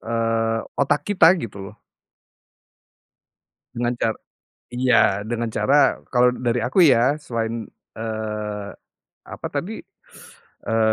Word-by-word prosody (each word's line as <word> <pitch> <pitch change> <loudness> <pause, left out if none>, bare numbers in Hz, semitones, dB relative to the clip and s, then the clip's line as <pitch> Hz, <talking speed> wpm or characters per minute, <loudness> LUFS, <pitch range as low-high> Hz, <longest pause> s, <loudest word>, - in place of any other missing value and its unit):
Eee, 115 0 -1 0.2
otak 140 +1 +1
kita 190 -5 +5
gitu 105 - -7
loh. 105 - -19 2.0
Dengan 120 +1 -1
car 115 -2 -1 0.6
iya, 120 -5 +3
dengan 115 +2 -3
cara, 125 +6 +2
kalau 125 0 +3
dari 120 -1 -1
aku 130 +10 +2
ya, 130 -3 +5
selain, 115 -3 -4 0.2
eee, 105 -2 -4 0.5
apa - - -8
tadi, - - -4 0.9
eee, 110 -1 +2
115 Hz, 105 wpm, -22 LUFS, 110-125 Hz, 2.0 s, kita